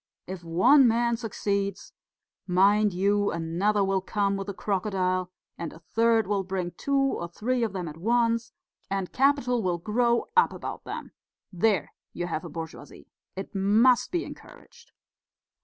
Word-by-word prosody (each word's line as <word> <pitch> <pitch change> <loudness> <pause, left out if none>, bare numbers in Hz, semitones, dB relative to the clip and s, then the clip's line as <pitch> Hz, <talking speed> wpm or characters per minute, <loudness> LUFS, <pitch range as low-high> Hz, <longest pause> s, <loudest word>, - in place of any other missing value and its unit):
If 185 -1 -7
one 190 - +5
man 235 +1 +2
succeeds, 200 -3 -3 0.5
mind 200 +3 +4
you, 200 +3 +1
another 175 +6 0
will 195 -1 +1
come 200 0 0
with 195 0 -5
a - - -3
crocodile, 185 -3 -1 0.3
and 170 -2 -4
a - - -12
third 225 +6 +2
will 200 0 0
bring 185 -2 -3
two 275 +10 -1
or 275 -10 0
three 240 +8 -2
of 220 -4 -2
them 180 -3 -4
at 150 0 -8
once, 230 +4 +1 0.4
and 195 -2 -3
capital 260 -3 +2
will 180 -3 0
grow 235 +6 +1
up 460 - +4
about - - -7
them - - -6 0.4
there 190 -2 +1 0.2
you 175 - -3
have 160 -3 -3
a 170 - -7
bourgeoisie. 160 -2 -9 0.2
It 195 +1 -7
must 225 +6 +3
be 345 -1 -1
encouraged." 470 0 -14
200 Hz, 155 wpm, -27 LUFS, 180-230 Hz, 0.5 s, one